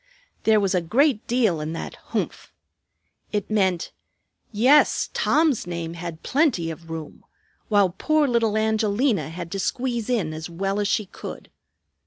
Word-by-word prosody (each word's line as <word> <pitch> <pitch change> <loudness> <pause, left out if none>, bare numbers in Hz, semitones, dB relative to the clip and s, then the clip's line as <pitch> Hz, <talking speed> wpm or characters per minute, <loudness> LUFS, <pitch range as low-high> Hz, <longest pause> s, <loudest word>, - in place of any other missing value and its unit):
There 220 -1 +5
was 195 -2 +1
a 180 - +2
great 235 - +2
deal 225 -10 +2
in 155 +1 -4
that 165 - -5
"humph." - - -4 0.8
It 210 -1 -2
meant: 190 -5 +1 0.6
Yes, 255 +8 +4
Tom's 305 - +2
name 170 -1 -4
had 170 -1 -7
plenty 255 - +1
of 165 +1 -11
room, 160 -2 -7 0.5
while 200 -4 +4
poor 305 - +1
little 230 -4 +1
Angelina 220 - +1
had 170 0 -7
to 195 - -3
squeeze 240 +1 -2
in 200 -11 0
as 160 +2 -6
well 195 +4 -2
as 205 - +1
she 210 +1 +1
could. 190 - -9
205 Hz, 150 wpm, -24 LUFS, 170-235 Hz, 0.8 s, There